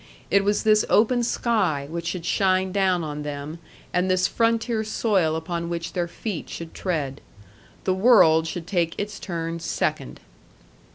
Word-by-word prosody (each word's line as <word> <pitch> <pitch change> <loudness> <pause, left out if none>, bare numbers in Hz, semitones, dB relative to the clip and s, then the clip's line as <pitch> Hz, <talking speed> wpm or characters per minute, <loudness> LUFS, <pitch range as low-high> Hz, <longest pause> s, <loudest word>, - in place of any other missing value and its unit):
It 200 0 +4
was 205 +1 +1
this 215 -1 +4
open 240 +3 +4
sky 205 - 0
which 170 +2 -5
should 175 -1 -4
shine 190 0 +2
down 185 -3 +1
on 150 -1 -5
them, 150 +2 -6 0.3
and 180 +1 +1
this 185 0 +3
frontier 230 -1 +1
soil 200 -7 +1
upon 170 +1 -3
which 170 0 -4
their 175 -1 -1
feet 190 0 -5
should 165 -1 -7
tread. 145 -7 -3 0.6
The 185 - +1
world 185 -6 +5
should 165 0 -5
take 170 -3 0
its 205 0 -4
turn 170 -2 -4
second. - - -2
180 Hz, 155 wpm, -24 LUFS, 165-205 Hz, 0.6 s, world